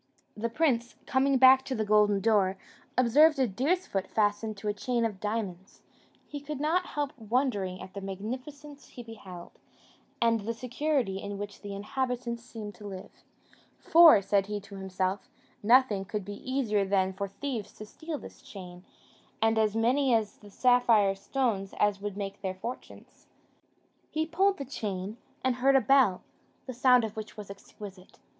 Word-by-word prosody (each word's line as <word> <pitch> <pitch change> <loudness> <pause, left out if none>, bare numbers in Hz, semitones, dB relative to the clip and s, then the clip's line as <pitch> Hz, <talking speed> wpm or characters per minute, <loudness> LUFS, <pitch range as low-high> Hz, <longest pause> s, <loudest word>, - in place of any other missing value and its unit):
The 230 +2 -2
prince, 240 -3 0
coming 270 +1 +2
back 260 +1 +7
to 265 - -3
the 220 - -1
golden 210 -1 +3
door, 200 -3 +2 0.4
observed 285 +6 +5
a 260 -2 +2
deer's 285 - 0
foot 195 -1 -3
fastened 215 0 0
to 210 - -6
a 205 - +1
chain 235 +3 -1
of 210 -4 -3
diamonds; 200 -4 -5 0.4
he 290 - -6
could 290 0 -6
not 320 +5 +1
help 290 -2 -1
wondering 215 -5 -1
at 185 - -10
the 200 - -6
magnificence 255 +9 -7
he 245 - -10
beheld, 195 -6 -11 0.7
and 230 -1 +3
the 225 +3 -4
security 250 -4 -1
in 200 0 -5
which 205 0 -7
the 200 -1 -6
inhabitants 240 +2 -3
seemed 220 -4 -8
to 205 +3 -10
live; 190 -2 -8 0.7
"For," 325 -11 +7
said 195 0 +1
he 210 0 -3
to 200 0 -12
himself, 190 +4 -3 0.3
"nothing 225 -3 +4
could 210 -2 -4
be 205 +6 -7
easier 220 -7 +1
than 190 -1 +1
for 200 +1 -4
thieves 215 0 -5
to 215 - -10
steal 315 +8 -6
this - - -12
chain, 180 -2 -11 0.6
and 225 0 +2
as 215 -1 +1
many 250 +3 +3
of 215 -2 -2
the 205 - -14
sapphire 230 -4 +4
stones 195 -1 -2
as 205 -1 +2
would 205 -1 -5
make 200 -1 -5
their 190 -1 -3
fortunes." 235 +7 -9 0.8
He 315 0 -1
pulled 385 +5 +2
the 275 - -5
chain, 205 -5 -5 0.3
and 260 -1 +1
heard 270 +2 +3
a - - +7
bell, 255 -6 +3 0.4
the 255 - -6
sound 250 0 +5
of 220 -1 -4
which 220 0 -8
was 205 -2 -8
exquisite. 195 -1 -12
220 Hz, 170 wpm, -29 LUFS, 200-260 Hz, 0.8 s, back